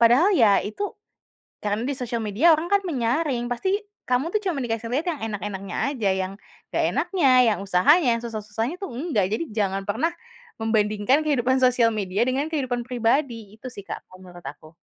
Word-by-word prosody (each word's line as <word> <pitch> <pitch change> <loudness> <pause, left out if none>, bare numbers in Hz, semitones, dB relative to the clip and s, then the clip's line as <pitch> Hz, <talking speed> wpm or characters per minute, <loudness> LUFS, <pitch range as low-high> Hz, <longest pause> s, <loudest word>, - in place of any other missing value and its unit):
padahal 245 - +5
ya 215 -6 +5
itu 310 - -4 0.7
karena 210 +3 -1
di 280 - -1
sosial 235 -2 -3
media 235 +12 +4
orang 335 +3 -4
kan 400 - +5
menyaring, 255 -2 0
pasti 380 - 0 0.3
kamu 255 +7 +1
tuh 425 - +3
cuma 315 - -3
dikasih 230 -1 -3
lihat 305 +7 0
yang 295 - -8
enak-enaknya 195 -1 -5 0.2
aja, 215 -8 0
yang 190 0 -2 0.4
enggak - - +1
enaknya, 335 -9 +2 0.2
yang - - -7
usahanya, 245 - +4
yang - - -10
susah-susahnya 225 +5 -3
tuh 390 - -4
enggak. 240 - 0
Jadi 225 - 0
jangan 195 -2 -1
pernah 220 +11 0 0.5
membandingkan 220 +5 +2
kehidupan 260 -3 +2
sosial 250 -2 +4
media 200 -1 -2
dengan 260 +2 0
kehidupan 255 -5 -1
pribadi, 235 -3 -1
itu 255 +3 -8
sih 200 - -8
Kak - - -6
kalau 185 0 -15
menurut 175 -1 -13
aku. 150 +3 -10
235 Hz, 175 wpm, -24 LUFS, 210-280 Hz, 0.7 s, padahal